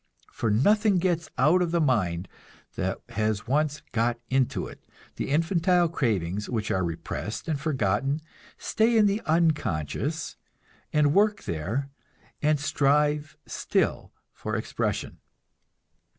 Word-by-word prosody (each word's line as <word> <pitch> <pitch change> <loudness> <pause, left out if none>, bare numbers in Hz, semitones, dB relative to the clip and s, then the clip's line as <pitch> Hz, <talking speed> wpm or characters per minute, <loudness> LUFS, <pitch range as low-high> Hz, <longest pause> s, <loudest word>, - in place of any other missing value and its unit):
For 115 - -1
nothing 205 - +4
gets 170 -3 0
out 155 +8 +4
of 175 - +1
the 170 +1 +1
mind 95 - +1 0.5
that - - -2
has 110 0 -1
once 150 +3 0
got 115 +1 0
into 130 -1 +1
it; - - -11 0.3
the - - -3
infantile 170 +3 +3
cravings 105 - -1
which 110 -4 -2
are 95 - +1
repressed 85 - -4
and 150 -4 -1
forgotten 135 -1 0 0.4
stay 225 +1 +2
in 215 - +6
the 205 +2 +1
unconscious, 155 - 0 0.5
and 150 -1 +3
work 210 +2 +3
there, 105 - -3 0.5
and 150 -1 +2
strive 145 +1 +1
still - - -1 0.2
for - - -4
expression. - - -2
145 Hz, 120 wpm, -27 LUFS, 110-165 Hz, 0.5 s, in